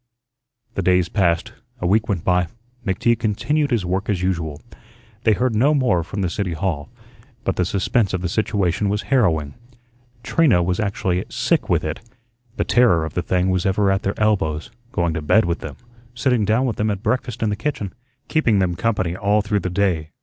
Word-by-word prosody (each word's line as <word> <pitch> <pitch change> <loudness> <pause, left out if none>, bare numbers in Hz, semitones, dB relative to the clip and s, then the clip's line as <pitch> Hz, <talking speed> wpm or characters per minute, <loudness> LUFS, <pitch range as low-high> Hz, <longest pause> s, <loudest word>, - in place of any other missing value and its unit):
The - - -2
days 90 -1 +2
passed, 85 -5 +1 0.3
a - - -3
week 105 +5 +2
went 90 -5 -1
by, 90 -2 +2 0.4
McTeague 115 +3 +1
continued 145 +8 0
his 115 -8 0
work 95 +4 -2
as 95 -4 0
usual. 80 -5 -2 0.7
They 110 - +5
heard 125 +3 0
no 135 +8 +3
more 100 - +2
from 100 +4 -4
the 90 - 0
City 95 -3 -2
Hall, 80 -3 -2 0.5
but - - -1
the 90 - +1
suspense 100 +3 +1
of 95 - -2
the 90 - -1
situation 100 0 0
was 105 +2 -1
harrowing. 80 - +2 0.7
Trina 120 - +3
was 90 +1 -1
actually 95 -3 -1
sick - - 0
with - - +2
it. 80 0 -3 0.6
The - - +1
terror 115 -10 +3
of 80 - -6
the 90 - 0
thing 90 +1 +1
was 90 -1 0
ever 100 0 +2
at 95 +1 +1
their 100 - -3
elbows, 90 -8 0 0.2
going 85 -2 0
to 80 - -3
bed 110 +9 +3
with 85 -1 -1
them, - - -7 0.4
sitting 120 -3 +1
down 110 +5 +2
with 120 - -2
them 110 +1 +1
at 100 -1 -3
breakfast 125 -2 -1
in 110 - +1
the - - 0
kitchen, 110 -4 -3 0.3
keeping 120 -10 +2
them 90 -2 +1
company 95 -4 0
all 105 +2 +1
through 105 -1 0
the 95 - -3
day. 90 -4 0
95 Hz, 195 wpm, -21 LUFS, 90-110 Hz, 0.7 s, They